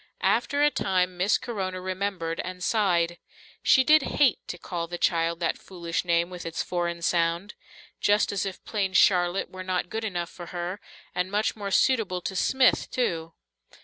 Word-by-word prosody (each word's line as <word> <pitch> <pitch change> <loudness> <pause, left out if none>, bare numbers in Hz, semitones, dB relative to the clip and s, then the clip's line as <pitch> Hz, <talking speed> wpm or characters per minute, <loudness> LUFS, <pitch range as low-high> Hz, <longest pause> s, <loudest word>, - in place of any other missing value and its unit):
After 285 0 +2
a 295 - +5
time 185 -5 0
Miss 185 +4 +2
Corona 190 -6 -4
remembered 185 -3 -3
and 180 0 -5
sighed. 175 -5 +1 0.4
She 265 - +5
did 310 +2 +6
hate 270 -4 +2
to 175 - -5
call 170 -1 -4
the 175 +1 -5
child 165 -1 +1
that 170 - 0
foolish 170 -3 -4
name 170 0 +1
with 180 -1 -7
its 165 0 -3
foreign 170 -1 -2
sound. 170 +3 0 0.5
Just 205 +1 +3
as 200 - -1
if 195 -2 -6
plain 195 -3 -1
"Charlotte" 180 -2 +3
were 185 - -7
not 185 -1 -2
good 225 +1 -3
enough 175 -5 -3
for 175 -2 -10
her, 175 +3 -4 0.3
and 180 +1 -1
much 210 +2 0
more 205 -2 -5
suitable 205 -4 +2
to 190 - -4
"Smith" 260 +7 +3
too! 165 -10 -2
185 Hz, 175 wpm, -26 LUFS, 170-205 Hz, 0.5 s, did